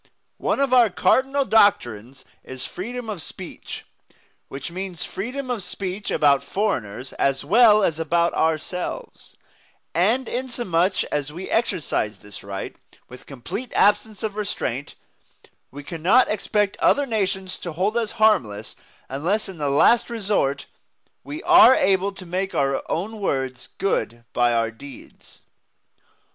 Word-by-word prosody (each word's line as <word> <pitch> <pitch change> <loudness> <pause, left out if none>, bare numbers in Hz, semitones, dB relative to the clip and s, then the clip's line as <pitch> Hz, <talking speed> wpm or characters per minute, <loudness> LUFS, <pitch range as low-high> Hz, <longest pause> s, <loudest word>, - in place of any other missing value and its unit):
One - - 0
of 275 -2 +1
our 240 -3 +6
cardinal 265 +9 +2
doctrines 135 - +2 0.2
is 130 -1 -6
freedom 240 +5 -6
of 205 -6 -5
speech, 180 +2 -9 0.6
which 135 +4 -7
means 185 -1 -5
freedom 255 +6 -5
of 235 -4 -2
speech 190 +2 -5
about 140 -2 +3
foreigners 130 - -2
as 135 +1 +1
well 215 +3 +6
as 160 -4 0
about 170 +1 +1
ourselves; 175 - -3 0.6
and, 225 +9 +2
inasmuch 205 -8 0
as 145 -1 -2
we 175 +5 -7
exercise 165 - 0
this 100 +1 -12
right 100 -1 -6 0.3
with 125 0 -13
complete 140 - -6
absence 210 0 +2
of 215 -2 -3
restraint, 145 - -3 0.7
we 145 +2 -10
cannot 175 - +3
expect 210 -1 0
other 285 - +3
nations 190 -5 -2
to 175 - -6
hold 190 +7 0
us 230 -2 -1
harmless 115 - +1 0.3
unless 175 +12 -1
in 190 -4 -10
the 145 -1 0
last 225 - +4
resort 200 - -1 0.6
we 300 +3 -7
are 350 -6 +8
able 195 +1 +2
to 190 -1 -10
make 185 +2 -3
our 135 0 +1
own 210 +7 -3
words 135 -9 -2
good 120 -11 -1
by 120 -1 +3
our 115 -1 +1
deeds. 130 +3 -14
185 Hz, 135 wpm, -23 LUFS, 140-220 Hz, 0.7 s, are